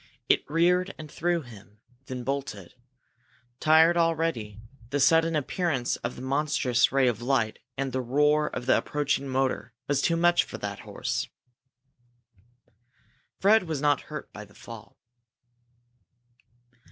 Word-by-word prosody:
It - - +2
reared 180 +4 +2
and 155 -2 -10
threw 170 -1 -1
him, 105 -4 -15 0.3
then 125 -1 -5
bolted. 130 -8 -4 0.9
Tired 160 +2 +5
already, 165 -11 0 0.3
the 145 - -1
sudden 165 +3 +4
appearance 150 -3 -1
of 120 - -5
the 125 - -9
monstrous 135 -2 +1
ray 135 -1 +3
of 120 -2 -1
light 120 -3 0 0.2
and 135 0 -2
the 130 +1 -1
roar 150 +4 +2
of 120 - -5
the 130 - +4
approaching 145 -1 -1
motor 130 -3 -1
was 140 -1 +1
too 170 +2 +2
much 175 +1 +4
for - - -8
that - - -5
horse. - - -3 2.1
Fred 210 +1 +4
was 155 -3 -2
not 145 0 +2
hurt 150 0 -7
by 105 - -8
the 100 0 -18
fall. 115 -2 -12
140 Hz, 135 wpm, -27 LUFS, 125-160 Hz, 2.1 s, Tired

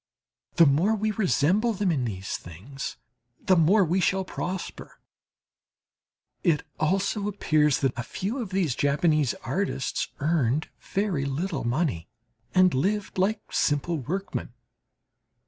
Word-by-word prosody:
The 170 - +7
more 165 +10 +3
we 215 +1 0
resemble 210 +2 +2
them 195 -2 0
in 135 -6 0
these 95 -4 -4
things 105 +12 -7 0.4
the 185 - +3
more 180 +4 +5
we 175 +4 +1
shall 190 +1 +1
prosper. 185 0 -6 1.4
It 165 -5 +2 0.2
also 195 +5 0
appears 155 -8 +2
that 135 -3 +2
a 120 - -3
few 195 - -4
of 225 -6 -4
these 185 -8 0
Japanese 150 0 +2
artists 190 -7 -1
earned 150 -1 +1
very 190 -8 -1
little 150 +1 -2
money 120 - -1 0.5
and 185 -1 +5
lived 195 +8 -1
like 200 +4 0
simple 150 +2 +1
workmen. 185 +9 -4
170 Hz, 125 wpm, -26 LUFS, 140-195 Hz, 1.4 s, The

